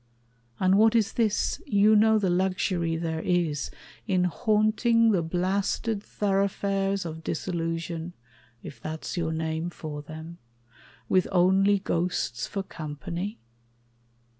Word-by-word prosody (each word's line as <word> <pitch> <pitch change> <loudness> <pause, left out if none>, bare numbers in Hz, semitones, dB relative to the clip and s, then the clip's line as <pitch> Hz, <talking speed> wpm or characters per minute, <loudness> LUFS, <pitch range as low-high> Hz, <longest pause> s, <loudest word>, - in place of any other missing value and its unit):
And 190 +1 +4
what 225 +1 +5
is 220 -3 +2
this? 220 -3 0
You 210 +1 +5
know 220 +1 +5
the 205 -3 +1
luxury 180 -2 0
there 160 -1 -2
is 165 -5 0 0.4
in 185 -3 +2
haunting 215 +4 +3
The 185 -5 +2
blasted 190 +5 -1
thoroughfares 195 -1 0
of 160 0 -6
disillusion 165 0 -3 0.5
If 140 - -10
that's 155 0 -5
your 165 -2 -1
name 160 +1 -2
for 155 -3 -7
them 160 +3 -9 0.7
with 185 -1 +3
only 190 +2 +4
ghosts 165 - -1
For 195 - -3
company? 170 +6 -5
185 Hz, 115 wpm, -27 LUFS, 165-200 Hz, 0.7 s, what